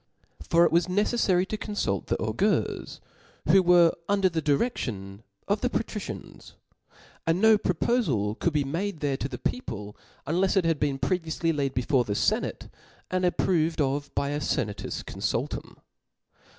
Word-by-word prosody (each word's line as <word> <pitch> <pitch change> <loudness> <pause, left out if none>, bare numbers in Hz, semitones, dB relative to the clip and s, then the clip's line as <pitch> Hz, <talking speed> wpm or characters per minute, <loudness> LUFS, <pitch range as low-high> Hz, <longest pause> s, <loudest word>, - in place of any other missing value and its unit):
book - - -12
for 170 +1 +5
it - - +2
was 170 +2 +3
neceffary 190 -1 +2
to 215 - -3
confult 205 - -2
the - - 0
augurs, - - -1 0.5
who^'P - - +3
W* - - +7
were 175 -2 +6 0.2
under 200 -1 +3
the 165 -2 -2
diredion 120 - -1 0.3
of - - +1
the - - +1
patricians; - - -5 0.7
and 165 +2 +2
no 220 +1 +6
propofal 175 - 0
could 170 - +1
be 150 -1 +1
made 170 +6 -3
there 140 -2 0
to 135 - -3
the 125 - -5
people^ 105 - -4 0.3
unlefs 185 +6 +1
it 185 - +3
had 165 -3 +1
been 140 -2 0
previouQy 165 0 -1
laid 140 -2 -1
before 125 +1 +2
the 105 - -3
fenate^ - - 0 0.4
and 185 0 +1
approved 170 -2 +1
of 145 0 0
by 140 - 0
a 145 +1 -1
fenatus 110 -7 -2
confultum. - - -3
165 Hz, 160 wpm, -27 LUFS, 135-185 Hz, 0.7 s, W